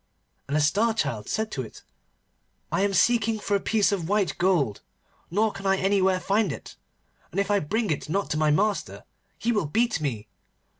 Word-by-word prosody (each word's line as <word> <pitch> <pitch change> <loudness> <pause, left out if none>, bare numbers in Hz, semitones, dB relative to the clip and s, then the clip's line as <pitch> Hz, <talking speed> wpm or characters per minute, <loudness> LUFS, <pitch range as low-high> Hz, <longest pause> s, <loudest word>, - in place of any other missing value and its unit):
And 145 +2 0
the - - +2
Star 210 +10 +2
Child 110 - -2
said 220 0 -1
to 135 - -3
it, 115 - -10 0.9
'I - - +1
am 200 - -1
seeking 225 -1 +3
for 205 -1 -3
a - - +2
piece 210 0 +2
of 180 -4 -2
white 205 -3 +1
gold, 170 - +1 0.5
nor 215 +5 +1
can 195 0 -6
I 195 0 +3
anywhere 190 -1 +2
find 195 0 +1
it, - - -8 0.5
and 185 - -3
if 200 0 0
I 205 - +4
bring 215 +5 -1
it 150 - -3
not 195 +5 0
to 150 - 0
my 155 0 +2
master 200 +7 0 0.3
he 235 - 0
will 205 -9 0
beat 225 +3 +1
me. 115 -8 -3
195 Hz, 195 wpm, -26 LUFS, 155-215 Hz, 0.9 s, I